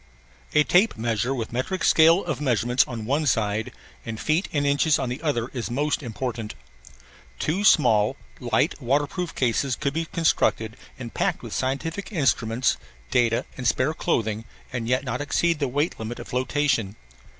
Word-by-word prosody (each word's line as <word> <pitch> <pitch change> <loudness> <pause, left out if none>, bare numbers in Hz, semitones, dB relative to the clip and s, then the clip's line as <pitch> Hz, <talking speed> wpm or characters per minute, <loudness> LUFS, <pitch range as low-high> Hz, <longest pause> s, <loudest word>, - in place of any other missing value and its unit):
A 150 - +6
tape 180 - +3
measure 115 +2 -1
with 115 -2 -4
metric 150 +10 -2
scale 165 +4 +5
of 150 -5 -3
measurements 125 -2 +2
on 115 -3 -5
one 145 +5 0
side 110 -2 0 0.3
and 110 -1 -6
feet 160 +5 +1
and 145 -2 0
inches 145 +2 +3
on 125 - -2
the 125 +4 -5
other 135 -6 -1
is 120 -3 -4
most 145 +6 0
important. 115 - -4 0.8
Two 180 - -1
small, 115 - +4 0.2
light - - 0
waterproof 145 +7 -1
cases 130 +1 +1
could 140 -2 -2
be 165 +1 -1
constructed 155 - +1 0.2
and 120 -3 -8
packed - - -1
with - - -7
scientific 160 - -2
instruments, 125 - +1 0.3
data, 115 -2 +2
and 125 -2 -2
spare 130 +6 +2
clothing 110 -10 -1 0.3
and 115 -2 -3
yet 130 +2 +1
not 125 0 -3
exceed 165 +2 +1
the 140 - 0
weight 145 +6 -1
limit 110 +2 -5
of - - -9
flotation. 130 -5 0
130 Hz, 160 wpm, -24 LUFS, 115-150 Hz, 0.8 s, A